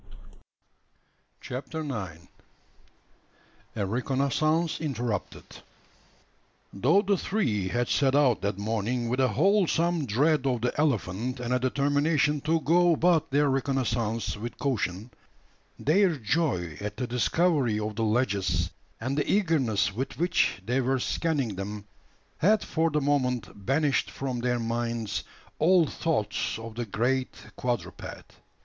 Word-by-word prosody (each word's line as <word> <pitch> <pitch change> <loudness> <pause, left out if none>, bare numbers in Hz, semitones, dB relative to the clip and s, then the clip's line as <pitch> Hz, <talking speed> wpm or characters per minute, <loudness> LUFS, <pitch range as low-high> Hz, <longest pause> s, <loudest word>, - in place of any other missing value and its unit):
CHAPTER 150 +5 -5
NINE. 95 - -6 1.5
A 105 -3 -1
RECONNOISSANCE 140 - 0
INTERRUPTED. 125 -8 -4 1.2
Though 155 - +3
the 200 -1 +2
three 115 - 0
had 120 +5 0
set 135 -2 +2
out 140 -5 +3
that 100 -1 -1
morning 115 +3 -1
with 125 +2 -1
a 130 - +4
wholesome 170 -2 +2
dread 140 +5 +2
of 125 -3 0
the 125 - 0
elephant, 125 -4 0
and 125 0 -2
a 125 - +2
determination 145 +3 +1
to 160 +2 +1
go 175 +2 +4
about 165 -1 +2
their 145 +2 +3
reconnoissance 125 -5 -1
with 115 +3 -7
caution, 110 -5 -2 0.7
their 175 +2 +3
joy 110 - -1
at 105 0 -5
the 125 - -1
discovery 125 -1 +1
of 105 0 -3
the 115 - -1
ledges, 100 -7 +1 0.3
and 130 +4 -2
the 145 - 0
eagerness 145 - +2
with 130 +6 -4
which 170 - +1
they 125 +4 +1
were 130 +1 +1
scanning 135 - -1
them, 100 +1 -5 0.5
had 210 +5 +3
for 165 0 0
the 150 -1 0
moment 130 -4 0 0.2
banished 145 +1 +2
from 130 -3 -4
their 125 0 0
minds 115 -1 -2 0.4
all 175 +1 +5
thoughts 150 -11 -1
of 115 0 -8
the 120 0 -4
great 125 +5 0 0.2
quadruped. 120 -2 -5
130 Hz, 130 wpm, -27 LUFS, 115-155 Hz, 1.5 s, all